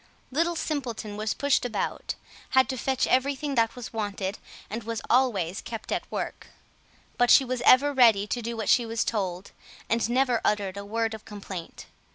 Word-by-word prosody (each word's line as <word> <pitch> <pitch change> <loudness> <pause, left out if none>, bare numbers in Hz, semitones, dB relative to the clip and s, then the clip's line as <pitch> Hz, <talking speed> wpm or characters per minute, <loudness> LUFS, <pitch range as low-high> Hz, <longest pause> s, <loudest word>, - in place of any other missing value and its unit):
Little 335 +5 +1
Simpleton 245 -10 -3
was 215 +1 -2
pushed 285 -1 +2
about, 245 -2 -3 0.4
had 260 - +6
to 265 - -1
fetch 265 +1 +1
everything 280 +2 +1
that 230 -3 +2
was 245 -2 -8
wanted, 205 -2 -3 0.3
and 225 +3 -4
was 230 0 -4
always 205 -8 +2
kept 225 -2 -7
at - - -2
work; - - -4 0.7
but 245 0 +4
she 270 - +7
was 255 -1 -2
ever 285 +3 +6
ready 230 -6 +5
to 240 +3 -3
do 235 0 -4
what 220 - -3
she 245 - +5
was 230 0 -1
told, 190 -4 -3 0.4
and 230 0 +2
never 250 -1 +2
uttered 200 -2 0
a 200 - -6
word 225 +2 -1
of 220 - -8
complaint. 195 -5 -8
230 Hz, 180 wpm, -27 LUFS, 210-255 Hz, 0.7 s, she